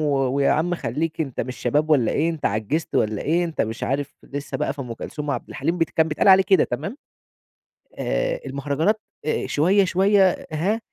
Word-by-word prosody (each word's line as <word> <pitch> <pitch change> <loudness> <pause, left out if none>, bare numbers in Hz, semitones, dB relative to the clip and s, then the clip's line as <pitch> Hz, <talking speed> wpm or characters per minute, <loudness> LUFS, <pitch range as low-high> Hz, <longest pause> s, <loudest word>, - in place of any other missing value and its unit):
و 150 -2 +1 0.2
ويا 140 0 +3
عم 175 +3 +1
خلّيك 160 +2 -3
أنت 135 -6 -2
مش 125 +1 -4
شباب 150 +5 0
والّا 135 -7 +3
إيه؟ 160 +3 +1
أنت 160 -3 -2
عجِّزت 110 +10 -2
والّا 105 -1 +1
إيه؟ 170 +3 +1
أنت 165 -2 -4
مش 110 +1 -2
عارف 140 +1 -2
لسه 140 -1 -5
بقى 135 - -1
في 140 - -9
أم 120 -2 -6
كلثوم 150 +5 -6
وعبد 140 - -3
الحليم، 170 +2 -2
بت 165 -2 +1
كان 160 0 +2
بيتقال 150 +5 +1
عليه 190 0 +8
كده، 190 - +4
تمام؟ 215 +7 -4 1.0
آآ - - -1
المهرجانات 145 +10 0 0.2
آآ 155 - -1
شوية 185 +7 +3
شوية، 190 +1 +3
هاه، 185 +9 0
155 Hz, 190 wpm, -23 LUFS, 140-175 Hz, 1.0 s, عليه